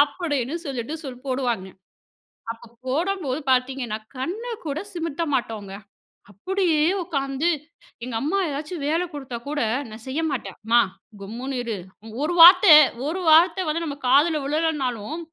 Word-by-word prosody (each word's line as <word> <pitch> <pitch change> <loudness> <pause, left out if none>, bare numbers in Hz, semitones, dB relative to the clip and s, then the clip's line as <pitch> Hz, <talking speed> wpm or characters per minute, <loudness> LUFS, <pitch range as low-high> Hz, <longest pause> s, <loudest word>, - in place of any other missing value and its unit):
அப்டின்னு 290 -2 0
சொல்லிட்டு 265 +2 -4
சொல் 255 0 -8
போடுவாங்க. 245 -7 -1 0.8
அப்ப 230 0 -12 0.2
போடம்போது 315 -1 -1
பார்த்தீங்கன்னா, 255 -3 0 0.2
கண்ணு 420 - -4 0.2
கூட 290 +2 -2
சிமத்த 330 -2 -3
மாட்டோங்க! 210 -5 -4 0.6
அப்டியே 330 - 0 0.2
உட்காந்து 275 -1 -2 0.6
எங்க 245 -2 -5
அம்மா 315 +8 0
ஏதாச்சும் 300 +2 -5
வேல 330 +4 +1
குடுத்தா 265 -4 -6
கூட, 295 0 -2 0.3
நான் 220 +1 -11
செய்ய 275 +5 -2
மாட்டேன். 195 -8 -4
"அம்மா 235 +2 +4 0.4
கம்முன்னு 245 +7 -5
இரு 230 -2 -3 0.5
ஒரு 340 +3 0
வார்த்த 365 +3 +10 0.4
ஒரு 345 +4 -2
வார்த்த 345 +3 +5
வந்து 330 +2 -1
நம்ம 285 -2 -5
காதுல 295 +4 +4
விழலனாலும், 295 -4 -1
285 Hz, 130 wpm, -23 LUFS, 250-330 Hz, 0.8 s, வார்த்த